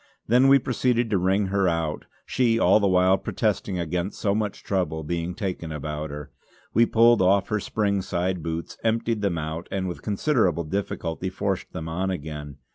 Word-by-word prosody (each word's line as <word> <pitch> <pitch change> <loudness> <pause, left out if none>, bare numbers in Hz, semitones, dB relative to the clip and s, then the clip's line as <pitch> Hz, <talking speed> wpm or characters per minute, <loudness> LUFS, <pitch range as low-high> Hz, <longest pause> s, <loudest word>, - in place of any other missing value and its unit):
Then 125 +4 +4
we 135 0 +7
proceeded 125 -2 0
to 100 - +2
wring 95 +3 +2
her 100 -2 +3
out, 80 -3 -1 0.2
she 120 -3 +2
all 110 - +5
the 100 - +2
while 95 +1 +4
protesting 105 -4 -1
against 85 +3 -3
so 100 -2 +1
much 105 -1 -2
trouble 90 -5 -1
being 85 +2 -3
taken 90 -5 -4
about 75 +1 -4
her. 75 0 -8 0.4
We 115 +2 +5
pulled 115 -1 +5
off 95 +1 +3
her 110 - 0
spring 100 -1 0
side 90 -1 -2
boots, 80 +1 -5
emptied 115 -1 0
them 100 -4 0
out 80 +2 -4
and, 95 -1 -2
with 90 - -6
considerable 105 - +1
difficulty, 90 0 -3
forced 95 0 -3
them 80 -3 -6
on 90 +4 -2
again. 75 -5 -6
95 Hz, 180 wpm, -25 LUFS, 85-105 Hz, 0.4 s, we